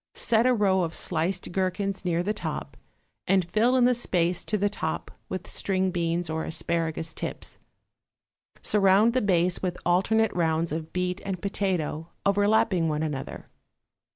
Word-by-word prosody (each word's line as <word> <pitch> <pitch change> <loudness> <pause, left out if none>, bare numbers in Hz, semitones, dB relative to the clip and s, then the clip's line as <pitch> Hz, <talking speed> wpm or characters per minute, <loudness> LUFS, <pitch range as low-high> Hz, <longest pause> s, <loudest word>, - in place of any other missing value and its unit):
Set 230 +1 +3
a 255 - +4
row 195 -3 +3
of 165 -2 -2
sliced 175 +2 -1
gherkins 190 +1 -1
near 175 -1 0
the 210 +3 0
top, 210 - -5 0.5
and 190 -2 +3
fill 225 +8 +2
in 250 -1 +5
the 250 - +4
space 180 -7 +1
to 215 - -1
the 205 +1 +2
top 205 - -3 0.2
with - - -4
string 190 -1 0
beans 170 0 -1
or 160 0 -2
asparagus 160 -1 -2
tips. - - -5 1.0
Surround 205 +3 +4
the 255 - +2
base 180 -3 +2
with 180 -2 -2
alternate 220 +6 +2
rounds 165 -1 0
of 160 +1 -4
beet 180 +1 -2
and 190 -2 -3
potato 175 -5 -2 0.2
overlapping 200 -3 +3
one 150 0 -1
another. 145 -4 -5
185 Hz, 155 wpm, -26 LUFS, 165-205 Hz, 1.0 s, in